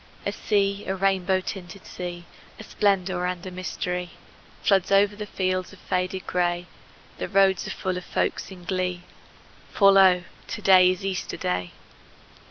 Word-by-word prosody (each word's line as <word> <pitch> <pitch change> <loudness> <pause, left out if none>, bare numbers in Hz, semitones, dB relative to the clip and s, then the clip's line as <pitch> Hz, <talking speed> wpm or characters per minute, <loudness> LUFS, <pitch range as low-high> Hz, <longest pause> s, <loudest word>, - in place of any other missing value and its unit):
A - - 0
sea, 200 -1 0
a 190 - -1
rainbow 190 -1 +1
tinted 185 0 -8
sea, 175 -1 -7 0.3
A - - -7
splendor 190 -4 0
and 180 0 -4
a 185 - -6
mystery, 180 -1 -4 0.5
Floods 195 -3 +3
o'er 195 +1 +6
the 205 +1 -8
fields 185 0 -2
of - - -13
faded 185 +1 -2
gray: 175 -1 0 0.5
The - - -3
roads 190 0 +3
are - - -5
full 185 -1 -3
of 180 - -6
folks - - -2
in 185 -2 -11
glee, 180 -1 -2 0.7
For 195 -1 +6
lo, 190 -2 +6 0.2
to - - -5
day 185 -1 +7
is 185 +1 -2
Easter 190 -1 -3
Day! 90 0 -2
185 Hz, 160 wpm, -25 LUFS, 180-195 Hz, 0.7 s, day